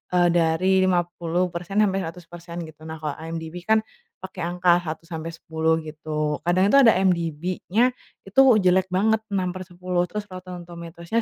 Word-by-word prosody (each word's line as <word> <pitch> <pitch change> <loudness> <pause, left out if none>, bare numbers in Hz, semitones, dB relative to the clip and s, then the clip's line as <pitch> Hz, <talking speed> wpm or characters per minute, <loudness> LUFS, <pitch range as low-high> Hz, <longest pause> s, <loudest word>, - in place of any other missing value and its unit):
eee, 175 -1 +5
dari 170 +2 +2
50%-100%, 175 0 -1
gitu. 155 -1 -15
Nah, 160 - -5
kalau 150 -2 -2
IMDb 165 +1 -6
kan 220 0 +4 0.4
pakai 190 0 -8
angka 175 0 +3
1-10, 160 0 -2
gitu. 155 -1 -3
Kadang 175 +2 +2
itu - - +6
ada 230 -5 +7
IMDb-nya 180 +6 +1 0.3
itu 195 +7 +4 0.2
jelek 185 +1 +3
banget, 220 +4 +2
6/10, 180 -1 -2
terus 210 -1 -4
Rotten 180 -1 -8
Tomatoes-nya 170 +5 -4
175 Hz, 125 wpm, -24 LUFS, 165-185 Hz, 0.4 s, ada